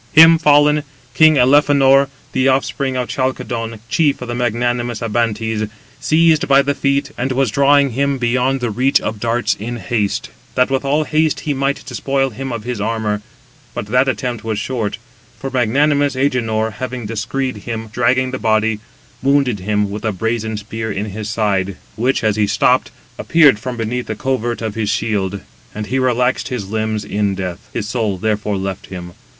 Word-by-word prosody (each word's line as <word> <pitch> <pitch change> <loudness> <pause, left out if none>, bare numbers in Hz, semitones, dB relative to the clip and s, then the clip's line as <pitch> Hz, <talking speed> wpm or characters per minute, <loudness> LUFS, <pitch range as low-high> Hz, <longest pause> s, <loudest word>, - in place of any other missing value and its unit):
Him 165 +1 +8
fallen, 150 -1 +4 0.3
king 155 +3 +6
Elephenor, 135 +1 +5 0.2
the 130 0 +1
offspring 135 0 0
of 125 -1 -1
Chalcodon, 115 -4 -3
chief 145 +2 +1
of 125 - -7
the - - -2
magnanimous 120 -1 -1
Abantes, 110 -1 -1 0.3
seized 160 -1 +3
by 140 0 +5
the 140 +1 0
feet, 140 0 0
and 130 +2 -1
was 130 -3 +1
drawing 140 0 +4
him 140 +3 0
beyond 125 +2 0
the 120 -2 -1
reach 130 +6 +2
of 110 -1 -4
darts 120 +2 0
in 120 +4 -5
haste, 110 -4 -2 0.2
that 125 +1 +2
with 135 0 0
all 145 +3 +1
haste 155 0 +1
he 150 - -1
might 140 +1 -1
despoil 135 +2 -1
him 135 +4 -5
of 115 -3 -4
his 120 -3 -4
armour: 105 -1 -1 0.5
but - - -3
that 125 +5 +2
attempt 125 -4 -3
was 110 -2 -2
short; 110 -2 -2 0.4
for 135 - -5
magnanimous 140 +3 +2
Agenor 115 -5 0
having 125 +1 -5
descried 115 +3 -3
him 110 +2 -5
dragging 130 +2 +2
the 130 - -4
body, 110 -1 +1 0.4
wounded 135 -5 +2
him 105 +1 -1
with 105 +1 -6
a 110 - 0
brazen 110 +2 -2
spear 110 +1 -5
in 100 0 -4
the 110 +1 -5
side, 100 -3 -1 0.2
which, 125 +4 0
as 110 -1 +1
he 105 -1 +2
stooped, - - +2 0.3
appeared 150 -10 +5
from 125 +2 -5
beneath 120 +2 -3
the 110 - -3
covert 120 -1 -2
of 110 -2 -2
his 110 -2 -2
shield, 100 -2 -1 0.3
and 105 0 -4
he 130 +5 -1
relaxed 125 0 +1
his 120 -7 -4
limbs 110 0 -2
[in 100 -1 -1
death]. 90 -2 -4
His 105 -3 -3
soul 110 -4 -1
therefore 105 0 -1
left 95 0 -4
him. 90 -2 -8
120 Hz, 175 wpm, -18 LUFS, 110-135 Hz, 0.5 s, Him